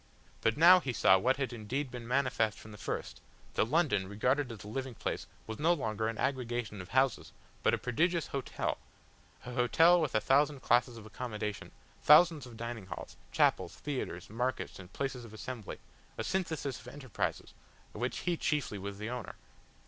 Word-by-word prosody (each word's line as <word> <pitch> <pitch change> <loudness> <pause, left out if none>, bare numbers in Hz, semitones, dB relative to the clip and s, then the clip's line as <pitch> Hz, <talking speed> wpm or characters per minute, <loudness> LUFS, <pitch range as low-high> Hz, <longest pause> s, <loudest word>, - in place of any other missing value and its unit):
But - - +2
now 175 +3 +9
he 130 -8 -3
saw 95 -4 +5
what 130 +6 +2
had 135 -3 -2
indeed 125 +5 -3
been 120 -2 -7
manifest 125 -4 +1
from 110 - -12
the 105 - -11
first, - - -4 0.3
that - - +2
London, 135 - +2
regarded 125 +7 0
as 110 -5 -9
a - - -10
living 130 +2 -4
place, - - -3 0.2
was 110 0 -6
no 165 +3 +4
longer 110 -8 -1
an 115 -1 -3
aggregation 120 -6 -2
of 90 - -11
houses 130 0 +1 0.3
but - - +3
a - - -4
prodigious 170 +7 +1
hotel, 135 -2 -3 0.7
an 125 - -6
hotel 165 +8 +5
with 150 -8 -1
a - - +5
thousand 140 +3 +2
classes 120 0 +3
of 110 - -10
accommodation, 105 -2 -5 0.3
thousands 150 -3 +6
of 115 -2 -12
dining 115 -4 -5
halls, - - -7 0.2
chapels, - - +2
theatres, 130 -11 -4
markets 125 +1 -3
and 95 0 -11
places 135 -3 -3
of 110 -2 -11
assembly, 115 -1 -6 0.4
a - - -2
synthesis 160 -8 -2
of - - -15
enterprises, 130 -7 -4 0.4
of - - -8
which - - -2
he 175 - 0
chiefly 145 -10 -1
was 100 +1 -6
the 105 +3 -4
owner. 125 -3 -5
125 Hz, 180 wpm, -32 LUFS, 110-140 Hz, 0.7 s, now